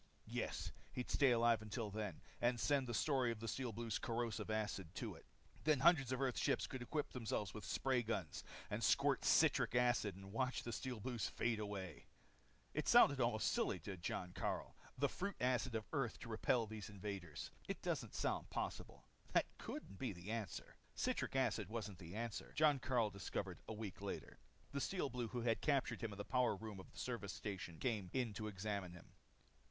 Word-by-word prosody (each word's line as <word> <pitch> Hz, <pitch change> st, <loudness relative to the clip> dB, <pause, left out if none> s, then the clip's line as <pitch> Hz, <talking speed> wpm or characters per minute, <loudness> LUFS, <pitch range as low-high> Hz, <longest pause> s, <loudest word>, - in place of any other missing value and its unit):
Yes, -, -, -2 dB, 0.2 s
he'd 125 Hz, -, -3 dB
stay 140 Hz, -2 st, +5 dB
alive 115 Hz, -2 st, +4 dB
till 105 Hz, -1 st, -2 dB
then. 105 Hz, -5 st, -3 dB, 0.2 s
And 120 Hz, 0 st, +3 dB
send 140 Hz, -1 st, +3 dB
the 120 Hz, -, -2 dB
story 130 Hz, -4 st, +3 dB
of 115 Hz, -, -4 dB
the 115 Hz, -, -4 dB
Steel 125 Hz, +2 st, -1 dB
Blues' 115 Hz, 0 st, -2 dB
corrosive 115 Hz, -3 st, -1 dB
acid 105 Hz, -5 st, -1 dB
to -, -, -3 dB
it. -, -, -15 dB, 0.4 s
Then 150 Hz, -3 st, +4 dB
hundreds 145 Hz, -6 st, +6 dB
of 130 Hz, -, 0 dB
Earth's 135 Hz, -3 st, +1 dB
ships -, -, +2 dB
could 130 Hz, -, -5 dB
equip 145 Hz, +4 st, -1 dB
themselves 110 Hz, -5 st, -2 dB
with 110 Hz, -, -6 dB
spray 130 Hz, -2 st, +2 dB
guns 100 Hz, -9 st, -2 dB, 0.3 s
and -, -, -1 dB
squirt -, -, +4 dB
citric -, -, +5 dB
acid 120 Hz, -5 st, +3 dB
and 95 Hz, +1 st, -10 dB
watch 125 Hz, +2 st, 0 dB
the 120 Hz, -, -3 dB
Steel 125 Hz, 0 st, -3 dB
Blues 120 Hz, -1 st, -1 dB
fade 115 Hz, -2 st, 0 dB
away. 100 Hz, -6 st, -5 dB, 0.7 s
It -, -, -1 dB
sounded -, -, +8 dB
almost -, -, +3 dB
silly -, -, +2 dB
to 95 Hz, +4 st, -4 dB
Jon 90 Hz, +1 st, -3 dB
Karyl. 90 Hz, -, -2 dB, 0.2 s
The 140 Hz, +2 st, +3 dB
fruit 200 Hz, +8 st, -3 dB
acid 125 Hz, -1 st, +2 dB
of 110 Hz, -1 st, -1 dB
Earth 135 Hz, -7 st, 0 dB
to 115 Hz, -, -7 dB
repel 115 Hz, +1 st, +2 dB
these 110 Hz, -1 st, -6 dB
invaders 95 Hz, -5 st, -5 dB, 0.2 s
it -, -, -3 dB
doesn't -, -, -1 dB
sound -, -, 0 dB
possible. -, -, -4 dB, 0.3 s
That -, -, +5 dB
couldn't 95 Hz, -, -6 dB
be 130 Hz, -6 st, -1 dB
the 90 Hz, +4 st, -6 dB
answer. 110 Hz, -6 st, -4 dB, 0.2 s
Citric -, -, 0 dB
acid -, -, +2 dB
wasn't 105 Hz, -4 st, -4 dB
the 85 Hz, +1 st, -8 dB
answer, 115 Hz, -1 st, -3 dB
Jon 150 Hz, -3 st, +5 dB
Karyl 120 Hz, -5 st, +2 dB
discovered 100 Hz, -, -3 dB
a -, -, -3 dB
week 105 Hz, -3 st, -5 dB
later. -, -, -5 dB, 0.3 s
The 140 Hz, 0 st, -1 dB
Steel 180 Hz, -5 st, 0 dB
Blue 120 Hz, -1 st, -1 dB
who 120 Hz, +2 st, -3 dB
had 115 Hz, -1 st, +2 dB
captured 135 Hz, -5 st, +2 dB
him 115 Hz, -, -2 dB
in 100 Hz, -, -7 dB
the 100 Hz, -, -4 dB
power 125 Hz, -4 st, +3 dB
room 105 Hz, -1 st, -6 dB
of 95 Hz, -, -10 dB
the -, -, -17 dB
service 110 Hz, -5 st, -3 dB
station 95 Hz, -5 st, -4 dB
came 105 Hz, -5 st, 0 dB
in 125 Hz, -5 st, +1 dB
to 110 Hz, +1 st, -3 dB
examine 100 Hz, -2 st, -2 dB
him. 90 Hz, -, -13 dB
115 Hz, 195 wpm, -41 LUFS, 100-125 Hz, 0.7 s, sounded